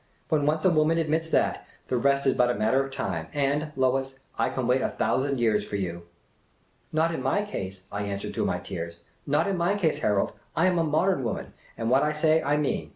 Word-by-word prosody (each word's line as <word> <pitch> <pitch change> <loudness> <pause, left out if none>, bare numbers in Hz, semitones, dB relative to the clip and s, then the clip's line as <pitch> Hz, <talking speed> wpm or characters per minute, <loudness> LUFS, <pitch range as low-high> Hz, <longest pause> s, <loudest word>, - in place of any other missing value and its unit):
When 150 -3 +2
once 155 +2 +1
a 185 - +6
woman 155 0 +3
admits 160 0 0
that, - - +1 0.2
the 130 - -1
rest 140 +3 +2
is 135 - +4
but 125 0 +3
a 120 - +1
matter 110 +6 +2
of 135 - -8
time— 90 -11 -3
and, 145 +2 0
Lois, 135 0 0 0.2
I - - +1
can 130 - -2
wait 125 +2 +2
a - - 0
thou - - +2
sand 140 -2 -1
years 110 -3 +2
for 105 - -6
you." 85 -3 -4 0.4
" - - -40
Not 160 +2 +1
in 160 - -3
my 135 +11 +1
case," 95 - -6
I 100 - -3
answered 100 0 -4
through - - -1
my - - 0
tears. 85 0 -6
" - - -37
Not - - +3
in 195 -2 -1
my 175 +4 +1
case, 165 -6 +1
Harold! 105 -2 +1 0.2
I 165 - +3
am 180 -2 +3
a - - +3
modern 160 0 +1
womaij, 115 - -3 0.3
and 115 +1 -1
what 135 +2 +5
I 150 - +1
say 155 +1 +3
I 145 +2 +1
mean. 150 -2 -1
135 Hz, 240 wpm, -26 LUFS, 115-155 Hz, 0.4 s, a